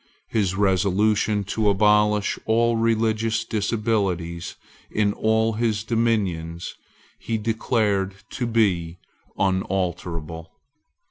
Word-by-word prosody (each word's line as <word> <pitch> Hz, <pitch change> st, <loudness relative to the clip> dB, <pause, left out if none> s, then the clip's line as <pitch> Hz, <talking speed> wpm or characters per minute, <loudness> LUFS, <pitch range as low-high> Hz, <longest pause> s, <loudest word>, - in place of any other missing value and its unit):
His 100 Hz, -4 st, 0 dB
resolution 100 Hz, +2 st, +2 dB
to 110 Hz, -2 st, +2 dB
abolish 105 Hz, +1 st, +3 dB
all 115 Hz, +1 st, +3 dB
religious 115 Hz, 0 st, +1 dB
disabilities 100 Hz, -6 st, -1 dB, 0.3 s
in 105 Hz, -1 st, +1 dB
all 110 Hz, +1 st, +1 dB
his 110 Hz, -2 st, 0 dB
dominions 100 Hz, -8 st, -1 dB, 0.5 s
he 115 Hz, -, -2 dB
declared 105 Hz, -3 st, 0 dB, 0.2 s
to 125 Hz, -, -2 dB
be 90 Hz, -7 st, +1 dB, 0.4 s
unalterable. 85 Hz, -4 st, -2 dB
105 Hz, 85 wpm, -23 LUFS, 95-110 Hz, 0.5 s, abolish